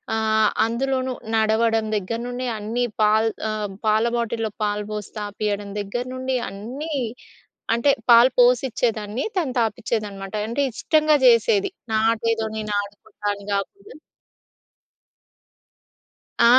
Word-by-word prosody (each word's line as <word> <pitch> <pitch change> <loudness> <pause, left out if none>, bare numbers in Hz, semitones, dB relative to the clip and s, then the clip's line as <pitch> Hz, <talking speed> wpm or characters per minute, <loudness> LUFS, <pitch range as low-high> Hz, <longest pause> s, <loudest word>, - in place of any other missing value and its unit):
ఆహ్, 220 -1 +3 0.2
అందులోనూ 260 +2 -1 0.2
నడవడం 220 0 +2
దగ్గర 210 +3 -2
నుండి 250 +1 -4
అన్ని 225 +4 -2 0.2
పాల్ 215 +1 +4 0.2
ఆహ్, 215 -1 -2 0.2
పాల 215 +1 +3
బాటిల్లో 230 -2 -1
పాలు 210 0 -1
పోసి 210 -1 -5
తాపియడం 205 0 -3
దగ్గర 205 +5 -3
నుండి 260 0 -2
అన్నీ. 255 +11 -6 0.8
అంటే 235 +5 +3 0.2
పాలు 235 +2 +8
పోసి 245 0 +6
ఇచ్చేదాన్ని 220 +1 -1
తను 310 -9 0
తాపిచ్చేదనమాట. 215 -3 -3
అంటే 280 +5 0
ఇష్టంగా 310 +2 +3
చేసేది. 390 - +4 0.2
నాదేదో 225 0 +1
నేను 215 -1 -3
ఆడుకుంటాని 205 0 -6
కాకుండా. 400 - -5 2.5
ఆ! - - +7
225 Hz, 110 wpm, -23 LUFS, 210-245 Hz, 2.5 s, పాలు